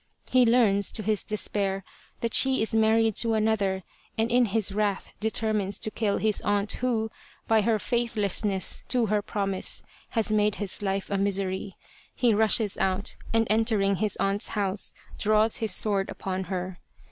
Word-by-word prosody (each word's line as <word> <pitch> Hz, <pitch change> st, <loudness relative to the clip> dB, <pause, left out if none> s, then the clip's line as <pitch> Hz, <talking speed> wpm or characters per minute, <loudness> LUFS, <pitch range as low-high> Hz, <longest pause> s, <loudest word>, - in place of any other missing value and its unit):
He 255 Hz, -2 st, +5 dB
learns, 215 Hz, -5 st, +3 dB
to 215 Hz, -, -1 dB
his 210 Hz, 0 st, 0 dB
despair, 200 Hz, -2 st, -2 dB, 0.4 s
that 230 Hz, -1 st, -2 dB
she 265 Hz, -3 st, +4 dB
is 220 Hz, -, 0 dB
married 220 Hz, -1 st, +3 dB
to 230 Hz, -1 st, +3 dB
another, 205 Hz, -3 st, 0 dB, 0.3 s
and 225 Hz, +1 st, 0 dB
in 245 Hz, 0 st, +4 dB
his 215 Hz, -1 st, 0 dB
wrath 205 Hz, -1 st, -2 dB
determines 215 Hz, -2 st, 0 dB
to 215 Hz, -, -1 dB
kill 215 Hz, -3 st, -1 dB
his 215 Hz, -1 st, +2 dB
aunt 205 Hz, 0 st, 0 dB
who, 225 Hz, -3 st, -1 dB, 0.4 s
by 220 Hz, -1 st, +4 dB
her 220 Hz, +1 st, +1 dB
faith 235 Hz, +2 st, -2 dB
lessness 200 Hz, -2 st, 0 dB
to 245 Hz, -2 st, +2 dB
her 210 Hz, 0 st, 0 dB
promise, 195 Hz, -2 st, -1 dB, 0.3 s
has 225 Hz, -1 st, +1 dB
made 210 Hz, -1 st, +2 dB
his 205 Hz, -1 st, +1 dB
life 195 Hz, -1 st, -2 dB
a 200 Hz, -, 0 dB
misery. 195 Hz, -1 st, -2 dB, 0.4 s
He 240 Hz, -3 st, +2 dB
rushes 215 Hz, -1 st, +1 dB
out 190 Hz, +1 st, 0 dB, 0.2 s
and 225 Hz, 0 st, +2 dB
entering 215 Hz, -3 st, +2 dB
his 215 Hz, 0 st, -1 dB
aunt's 195 Hz, +1 st, -1 dB
house 195 Hz, 0 st, 0 dB, 0.3 s
draws 215 Hz, +1 st, +3 dB
his 220 Hz, -2 st, -1 dB
sword 200 Hz, -3 st, +1 dB
upon 190 Hz, 0 st, -4 dB
her. 185 Hz, 0 st, -5 dB
210 Hz, 165 wpm, -26 LUFS, 195-220 Hz, 0.4 s, He